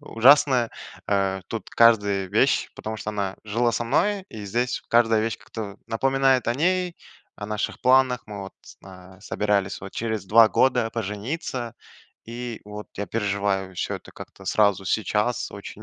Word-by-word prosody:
ужасное, 130 Hz, -2 st, +4 dB, 0.4 s
э, 95 Hz, -1 st, +1 dB
тут 115 Hz, -, -6 dB
каждая 100 Hz, -4 st, +4 dB
вещь, 110 Hz, +8 st, +2 dB
потому 110 Hz, 0 st, -5 dB
что 105 Hz, -, -4 dB
она 100 Hz, -2 st, -3 dB
жила 115 Hz, +3 st, +1 dB
со 120 Hz, -, -1 dB
мной, 195 Hz, -, +1 dB
и 105 Hz, -2 st, -8 dB
здесь 120 Hz, +5 st, -1 dB
каждая 115 Hz, -2 st, +4 dB
вещь 115 Hz, 0 st, -2 dB
как-то 105 Hz, -3 st, -7 dB
напоминает 135 Hz, +2 st, +2 dB
о 120 Hz, -, +1 dB
ней, 180 Hz, +3 st, 0 dB, 0.4 s
о 100 Hz, -, -6 dB
наших 105 Hz, -1 st, -3 dB
планах. 130 Hz, -1 st, +4 dB
Мы, 105 Hz, -2 st, -7 dB
вот, 95 Hz, -, -9 dB, 0.3 s
э, 95 Hz, 0 st, -13 dB
собирались, 105 Hz, -2 st, -1 dB
вот, 95 Hz, 0 st, -9 dB
через 110 Hz, -4 st, -3 dB
два 110 Hz, +2 st, +7 dB
года 125 Hz, -3 st, +2 dB
пожениться, 115 Hz, -, -4 dB, 0.5 s
и, 120 Hz, 0 st, -6 dB
вот, 105 Hz, 0 st, -9 dB
я 100 Hz, 0 st, -3 dB
переживаю 100 Hz, -3 st, -1 dB
всё -, -, -2 dB
это -, -, -14 dB
как-то -, -, -12 dB
сразу, 100 Hz, -2 st, +2 dB
сейчас 110 Hz, +4 st, 0 dB
очень 100 Hz, +1 st, -9 dB
110 Hz, 155 wpm, -24 LUFS, 100-125 Hz, 0.5 s, два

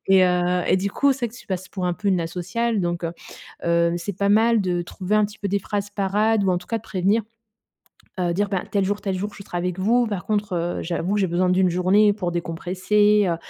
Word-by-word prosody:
et 190 Hz, -1 st, +6 dB
heu, 180 Hz, 0 st, +1 dB
et -, -, +4 dB
du 195 Hz, +2 st, -1 dB
coup, 280 Hz, +6 st, +3 dB
c'est 260 Hz, -2 st, -2 dB
vrai 225 Hz, -, -11 dB
que -, -, -11 dB
tu -, -, -16 dB
passes 185 Hz, -1 st, -4 dB
pour 185 Hz, -2 st, -3 dB
un 180 Hz, -, +1 dB
peu 205 Hz, +3 st, -2 dB
une 185 Hz, -3 st, +2 dB
asociale 190 Hz, +7 st, -2 dB
donc 175 Hz, -1 st, -2 dB
heu, 165 Hz, -, -2 dB, 0.5 s
heu, 170 Hz, 0 st, +2 dB
c'est 175 Hz, +2 st, -5 dB
pas 200 Hz, 0 st, +1 dB
mal 225 Hz, +2 st, +4 dB
de 180 Hz, -2 st, -1 dB
trouver 185 Hz, +4 st, -2 dB
un 215 Hz, -, +4 dB
petit 205 Hz, +1 st, -7 dB
peu 200 Hz, -, -3 dB
des 200 Hz, +1 st, +1 dB
phrases 205 Hz, +1 st, -4 dB
parades 205 Hz, +2 st, +1 dB
ou 190 Hz, -, +2 dB
en 180 Hz, -, +1 dB
tout 180 Hz, -, -15 dB
cas 230 Hz, -, -1 dB
de -, -, -16 dB
prévenir. 200 Hz, +1 st, +1 dB, 1.0 s
Heu, 175 Hz, -1 st, 0 dB
dire: 205 Hz, +3 st, 0 dB
«Ben, 190 Hz, -3 st, 0 dB
tel 200 Hz, -2 st, +1 dB
jour 205 Hz, +2 st, -1 dB
tel 195 Hz, -2 st, -2 dB
jour, 205 Hz, +3 st, -4 dB
je -, -, -10 dB
serai 180 Hz, -, -7 dB
avec 180 Hz, +1 st, -2 dB
vous. 235 Hz, +5 st, +3 dB
Par 200 Hz, -5 st, -4 dB
contre, 210 Hz, -2 st, -1 dB
heu, 175 Hz, 0 st, -2 dB
j'avoue, 175 Hz, +3 st, -1 dB
j'ai 200 Hz, -2 st, +2 dB
besoin 180 Hz, +2 st, +1 dB
d' 180 Hz, -, +2 dB
1 185 Hz, -1 st, +3 dB
journée 190 Hz, +4 st, +4 dB
pour 185 Hz, -4 st, -3 dB
décompresser, 185 Hz, +5 st, +1 dB
heu, 170 Hz, -, 0 dB
190 Hz, 260 wpm, -23 LUFS, 180-210 Hz, 1.0 s, et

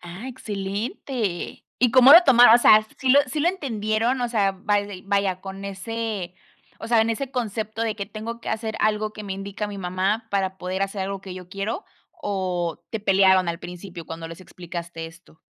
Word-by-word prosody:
Ah, 180 Hz, +7 st, -9 dB
excelente. 205 Hz, -2 st, -4 dB
¿Y 245 Hz, -1 st, +3 dB
cómo 255 Hz, +3 st, +8 dB
lo 340 Hz, -, +11 dB
tomaron? 245 Hz, -5 st, +8 dB
O -, -, +7 dB
sea, 215 Hz, -2 st, +7 dB
¿sí 265 Hz, -, -2 dB
lo 280 Hz, +2 st, +7 dB
sí 295 Hz, +4 st, -3 dB
lo 330 Hz, -, +3 dB
entendieron? 235 Hz, -, -1 dB
O 245 Hz, -, 0 dB
sea, 205 Hz, -4 st, +1 dB
vaidei 200 Hz, 0 st, -2 dB
vaya 195 Hz, -2 st, 0 dB
con 195 Hz, +1 st, -8 dB
ese 200 Hz, -1 st, -4 dB, 0.4 s
o 225 Hz, -, -7 dB
sea, 230 Hz, -1 st, +4 dB
en 225 Hz, +1 st, +2 dB
ese 260 Hz, +4 st, -3 dB
concepto 220 Hz, -3 st, -3 dB
de 225 Hz, -2 st, -1 dB
que: 200 Hz, -1 st, -4 dB
"Tengo 225 Hz, +2 st, -7 dB
que -, -, -7 dB
hacer 220 Hz, 0 st, -3 dB
algo 215 Hz, 0 st, +1 dB
que 215 Hz, -, -8 dB
me 195 Hz, -, -4 dB
indica 200 Hz, +2 st, -5 dB
mi 200 Hz, -1 st, -7 dB
mamá 190 Hz, +5 st, -1 dB
para 190 Hz, -1 st, -1 dB
poder 185 Hz, +2 st, -3 dB
hacer 195 Hz, 0 st, -2 dB
algo 195 Hz, 0 st, -4 dB
que 190 Hz, -1 st, -8 dB
yo 180 Hz, -1 st, -10 dB
quiero" 200 Hz, -, -4 dB, 0.4 s
o 180 Hz, -4 st, -2 dB
¿te 225 Hz, -, -3 dB
pelearon 190 Hz, -2 st, +4 dB
al 170 Hz, 0 st, -2 dB
principio 180 Hz, -1 st, -9 dB
cuando 165 Hz, 0 st, -7 dB
les 165 Hz, +2 st, -10 dB
explicaste 170 Hz, -2 st, -7 dB
esto? 165 Hz, 0 st, -17 dB
200 Hz, 195 wpm, -24 LUFS, 185-225 Hz, 0.4 s, lo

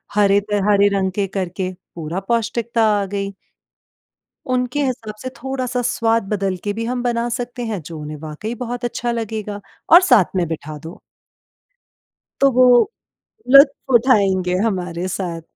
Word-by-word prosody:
हरे 200 Hz, -1 st, +4 dB
त 205 Hz, -1 st, +1 dB
हरे 200 Hz, -1 st, +5 dB
रंग 190 Hz, -1 st, 0 dB
के 195 Hz, +1 st, -1 dB
करके, 185 Hz, -1 st, -3 dB, 0.2 s
पूरा 165 Hz, +2 st, -4 dB
पौष्टिकता 235 Hz, 0 st, 0 dB, 0.2 s
आ -, -, -2 dB
गई। 200 Hz, 0 st, -4 dB, 1.1 s
उनके 255 Hz, +2 st, -1 dB
हिसाब 230 Hz, -5 st, -4 dB
से 255 Hz, -, -4 dB
थोड़ा-सा 255 Hz, -2 st, -2 dB
स्वाद 230 Hz, -1 st, +1 dB
बदल 195 Hz, -3 st, -1 dB
के 205 Hz, -, -2 dB
भी 225 Hz, +2 st, -4 dB
हम 245 Hz, +1 st, -2 dB
बना 235 Hz, -1 st, 0 dB
सकते 245 Hz, 0 st, -5 dB
हैं 215 Hz, -5 st, -3 dB
जो 155 Hz, +1 st, -9 dB
उन्हें 150 Hz, 0 st, -7 dB
वाक़ई 160 Hz, +9 st, -6 dB
बहुत 245 Hz, 0 st, -5 dB
अच्छा 240 Hz, 0 st, -2 dB
लगेगा, 215 Hz, -3 st, -4 dB, 0.3 s
और 345 Hz, +2 st, +9 dB
साथ 245 Hz, -, +3 dB
में 180 Hz, -2 st, +1 dB
बिठा 155 Hz, -1 st, -6 dB
दो। 165 Hz, +6 st, -9 dB, 1.4 s
तो 275 Hz, -, +6 dB
वो 255 Hz, -, +7 dB, 0.9 s
लुत्फ़ 275 Hz, -1 st, +6 dB
उठाएँगे 195 Hz, -7 st, +3 dB
हमारे 180 Hz, -3 st, -3 dB
साथ। 170 Hz, -3 st, -4 dB
210 Hz, 150 wpm, -20 LUFS, 185-245 Hz, 1.4 s, और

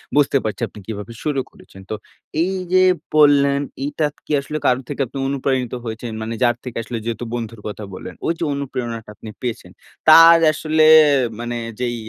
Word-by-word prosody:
বুঝতে 145 Hz, -1 st, +3 dB
পারছি 105 Hz, -3 st, -4 dB
আপনি 105 Hz, -, -13 dB
কিভাবে 105 Hz, +1 st, -6 dB
শুরু 145 Hz, -3 st, 0 dB
করেছেন। 95 Hz, -, -16 dB
তো 110 Hz, -, -2 dB, 0.5 s
এই 190 Hz, -, -1 dB, 0.2 s
যে 185 Hz, -, +6 dB, 0.3 s
বললেন 140 Hz, -2 st, +5 dB, 0.2 s
এইটা 145 Hz, +2 st, -1 dB, 0.2 s
কি -, -, -8 dB
আসলে 150 Hz, +2 st, -5 dB
কারো 125 Hz, +1 st, +3 dB
থেকে 145 Hz, -1 st, -3 dB
আপনি 135 Hz, -, -9 dB
অনুপ্রাণিত 130 Hz, -2 st, -1 dB
হয়েছেন? 115 Hz, +1 st, -5 dB
মানে 110 Hz, +1 st, -4 dB
যার 120 Hz, -1 st, +3 dB
থেকে 125 Hz, -2 st, -7 dB
আসলে 120 Hz, +1 st, -5 dB
যেহেতু 115 Hz, +1 st, -3 dB
বন্ধুর 115 Hz, -2 st, -6 dB
কথা 105 Hz, +1 st, -6 dB
বললেন, -, -, -8 dB
ওইযে 165 Hz, 0 st, -1 dB
অনুপ্রেরণাটা 120 Hz, -5 st, -5 dB
আপনি 110 Hz, -, -10 dB
পেয়েছেন, 120 Hz, -3 st, -5 dB, 0.4 s
তার 165 Hz, +1 st, +9 dB
আসলে 155 Hz, 0 st, +2 dB, 0.5 s
মানে 120 Hz, 0 st, -4 dB, 0.2 s
যেই 120 Hz, -1 st, -1 dB
125 Hz, 170 wpm, -20 LUFS, 115-145 Hz, 0.5 s, তার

